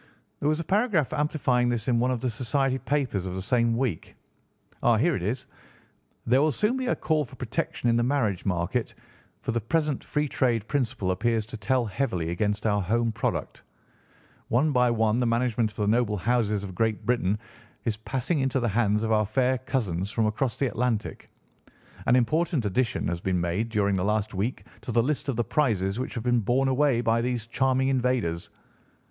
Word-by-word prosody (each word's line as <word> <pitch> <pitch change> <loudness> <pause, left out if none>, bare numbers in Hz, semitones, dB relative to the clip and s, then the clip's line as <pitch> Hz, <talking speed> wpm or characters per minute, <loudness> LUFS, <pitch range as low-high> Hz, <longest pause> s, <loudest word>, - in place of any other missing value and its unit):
"There 145 - +1
was 155 +1 +1
a - - -2
paragraph 195 - +1
amplifying 145 -5 +1
this 120 -3 -2
in 120 -2 +3
one 125 +2 +2
of 125 -3 -1
the 130 - 0
society 130 +3 0
papers 130 -12 -1
of 90 - -4
the 95 - -3
same 115 +1 +2
week. 120 -11 -2 0.7
Ah, 120 -2 +4
here 165 +10 +2
it - - -3
is: 115 +8 -2 0.8
'There 125 +3 +4
will 155 +1 +3
soon 210 - +1
be 260 -1 -2
a - - +2
call 155 -2 +1
for 130 -1 -12
protection 125 -1 -3
in 115 - +3
the - - +3
marriage 120 -7 0
market, 95 +6 -1 0.5
for - - -1
the 115 0 -1
present 150 +4 0
free 150 0 -1
trade 120 -6 0
principle 125 -9 -1
appears 110 +3 0
to 120 +3 -8
tell 125 +2 0
heavily 95 -7 -2
against 105 +4 -1
our 105 -2 +2
home 115 +5 +1
product. 115 +1 -3 0.9
One 140 +6 +2
by 125 -2 +3
one 115 0 +2
the 125 - +1
management 115 -1 +1
of 105 - -18
the 105 - 0
noble 110 -1 +2
houses 105 -1 0
of 95 -2 -6
Great 110 +3 -1
Britain 105 -5 +1 0.5
is 110 -3 0
passing 135 +8 -2
into 135 0 +1
the 120 - 0
hands 105 0 +1
of 110 - -1
our 105 -1 +3
fair 130 +3 +1
cousins 100 -9 -2
from 110 +1 0
across 110 +3 -1
the 140 - +1
Atlantic. 120 -2 -2 0.8
An 125 - +5
important 145 +2 +1
addition 115 +3 0
has 85 0 -2
been 95 -1 0
made 85 +7 -1
during 100 -3 +1
the 90 - 0
last 105 +1 0
week 105 +7 -2 0.2
to - - -5
the 115 0 +3
list 145 +1 -1
of 135 - 0
the 120 - +1
prizes 110 -6 0
which 130 - -4
have 115 - -3
been 120 -1 +2
borne 125 +5 +1
away 130 -2 +2
by 115 -1 +2
these 120 -2 -2
charming 130 +2 +1
invaders. 125 -10 0
120 Hz, 200 wpm, -26 LUFS, 105-130 Hz, 0.9 s, An